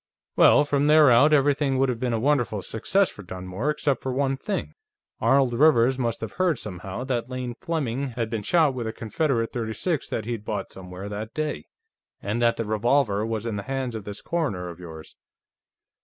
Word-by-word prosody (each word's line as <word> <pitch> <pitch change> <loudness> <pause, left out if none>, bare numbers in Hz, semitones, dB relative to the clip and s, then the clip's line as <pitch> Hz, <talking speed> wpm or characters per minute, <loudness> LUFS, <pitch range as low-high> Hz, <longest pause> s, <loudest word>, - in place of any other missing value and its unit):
"Well, - - +6
from 145 0 +1
there 150 -3 +7
out, 140 +6 +6
everything 140 -1 +3
would 135 +1 +3
have 120 -2 -2
been 125 -1 -1
a 115 - +1
wonderful 120 -6 +1
success 190 - +1
for - - -11
Dunmore, 95 +7 -4
except 150 -2 0
for 130 - -3
one 135 +1 0
thing. 195 +8 -4 0.5
Arnold 135 -2 +3
Rivers 130 -2 +4
must 115 -2 -1
have 110 - -4
heard, 180 -4 +1
somehow, 95 +3 -6
that 125 -2 -2
Lane 125 -1 -4
Fleming 140 -7 -2
had 115 -2 -1
been 110 -1 -3
shot 155 - +3
with 120 -3 -4
a 110 - -4
Confederate 115 +1 -1
.36 120 +7 -2
that 110 - -3
he'd 115 -3 -4
bought 105 -2 -4
somewhere 95 +1 -8
that 105 +2 -6
day, 155 0 -3 0.5
and 105 +4 -2
that 120 -1 +3
the 115 - -2
revolver 110 0 +1
was 110 0 -3
in 110 -3 -2
the - - -3
hands 135 -2 -2
of 110 -3 -6
this 105 0 -7
coroner 120 - -2
of 85 0 -10
yours. 80 -3 -10
120 Hz, 195 wpm, -25 LUFS, 110-140 Hz, 0.5 s, there